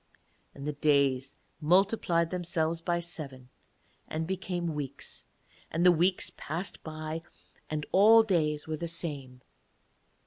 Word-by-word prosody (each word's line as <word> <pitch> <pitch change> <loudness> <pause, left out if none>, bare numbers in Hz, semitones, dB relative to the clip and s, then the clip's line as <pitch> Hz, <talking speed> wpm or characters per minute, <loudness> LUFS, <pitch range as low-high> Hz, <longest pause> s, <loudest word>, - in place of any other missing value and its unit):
And 140 - -8
the 150 - -1
days 140 -3 +2 0.2
multiplied 175 0 +3
themselves 170 -2 0
by 170 0 0
seven 140 -7 -5 0.6
and 160 +1 -2
became 180 -2 -2
weeks, 145 -3 -6 0.4
and 170 +3 0
the 180 - +9
weeks 175 +3 +1
passed 170 +6 -5
by, 155 0 -5 0.5
and 150 -1 -2
all 220 +4 +7
days 155 -8 0
were 155 -1 -2
the 170 - -4
same. 140 -7 -5
160 Hz, 125 wpm, -30 LUFS, 150-175 Hz, 0.6 s, the